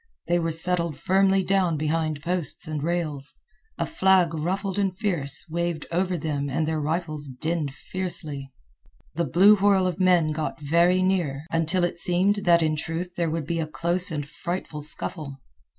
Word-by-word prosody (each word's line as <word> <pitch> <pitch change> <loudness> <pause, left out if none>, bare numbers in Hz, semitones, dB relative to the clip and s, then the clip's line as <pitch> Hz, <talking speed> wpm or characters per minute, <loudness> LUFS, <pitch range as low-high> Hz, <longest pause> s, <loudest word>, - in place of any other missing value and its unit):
They 175 +1 +2
were 165 -1 -1
settled 170 -2 +1
firmly 195 +2 +2
down 185 -4 +1
behind 155 -1 -1
posts 175 -1 -1
and 155 -2 -3
rails. 155 -4 -3 0.4
A - - -1
flag, 190 - +3
ruffled 190 +5 -2
and 190 -2 0
fierce, 155 -10 -1
waved 170 -1 -2
over 180 +1 0
them 145 -2 -2
and 155 +4 -1
their 160 -1 -1
rifles 155 -1 -3
dinned 150 +3 -3
fiercely. 155 -5 -2 0.6
The 170 +2 -1
blue 190 +9 +6
whirl 195 -1 +3
of 180 0 -2
men 180 -4 +3
got 155 +1 -3
very 170 +5 +3
near, 165 -7 0
until 165 +2 +1
it 175 0 -1
seemed 185 +4 +3
that 170 -1 +5
in 155 -1 +1
truth 165 +3 -4
there 170 -2 0
would 160 -1 -3
be 165 +2 -2
a 160 - -2
close 170 +3 0
and 145 -3 -4
frightful 170 -1 -5
scuffle. 150 -1 -3
170 Hz, 165 wpm, -25 LUFS, 155-180 Hz, 0.6 s, blue